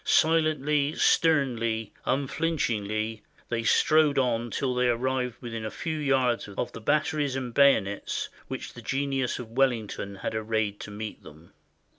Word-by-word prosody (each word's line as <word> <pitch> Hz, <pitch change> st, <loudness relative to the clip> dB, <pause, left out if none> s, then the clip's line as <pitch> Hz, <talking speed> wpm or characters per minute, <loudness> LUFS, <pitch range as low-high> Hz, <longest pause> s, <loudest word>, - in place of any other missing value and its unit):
Silently, 150 Hz, -2 st, +2 dB
sternly, 120 Hz, -9 st, +2 dB
unflinchingly, 115 Hz, -7 st, -1 dB, 0.3 s
they 120 Hz, -1 st, -1 dB
strode 155 Hz, +5 st, +4 dB
on 120 Hz, -3 st, +1 dB
till 130 Hz, +2 st, -1 dB
they 125 Hz, 0 st, +2 dB
arrived 125 Hz, 0 st, -1 dB
within 115 Hz, -3 st, -5 dB
a 110 Hz, -, -3 dB
few 160 Hz, +6 st, -4 dB
yards 130 Hz, -6 st, +1 dB
of -, -, -2 dB
the 115 Hz, -, -9 dB
batteries 145 Hz, +1 st, +1 dB
and 125 Hz, -3 st, -4 dB
bayonets 110 Hz, -8 st, +2 dB, 0.2 s
which -, -, -6 dB
the -, -, -10 dB
genius 135 Hz, -2 st, -1 dB
of 115 Hz, -3 st, -8 dB
Wellington 115 Hz, -6 st, 0 dB
had 95 Hz, -, -4 dB
arrayed 110 Hz, -2 st, -1 dB
to -, -, -7 dB
meet 105 Hz, +1 st, -6 dB
them. 80 Hz, +3 st, -15 dB
125 Hz, 140 wpm, -27 LUFS, 110-140 Hz, 0.3 s, strode